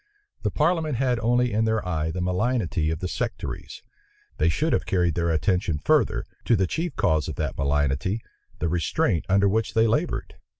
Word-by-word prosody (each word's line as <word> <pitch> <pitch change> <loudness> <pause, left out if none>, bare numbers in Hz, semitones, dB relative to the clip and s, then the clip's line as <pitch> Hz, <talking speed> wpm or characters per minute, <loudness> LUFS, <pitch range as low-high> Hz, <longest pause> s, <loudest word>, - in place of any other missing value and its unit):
The - - 0
parliament 160 -2 +1
had 125 -1 +1
only 120 +1 +2
in 110 +1 +2
their 110 -3 0
eye 80 -3 -1
the 90 +3 -3
malignity 90 -3 0
of 80 0 -3
the 90 - -1
sectaries; - - -5 0.5
they 80 - +3
should 155 - 0
have - - 0
carried 90 -3 +2
their 85 +1 0
attention 85 0 +1
further, - - +2 0.2
to 115 - +4
the 95 -2 +2
chief 160 - -3
cause 80 -1 +1
of 80 - -4
that 75 -4 -2
malignity, 70 - 0 0.4
the 85 - -1
restraint 85 0 0
under 100 +1 +4
which 110 +3 0
they 110 0 +5
labored. 115 +1 -1
95 Hz, 180 wpm, -25 LUFS, 80-115 Hz, 0.5 s, they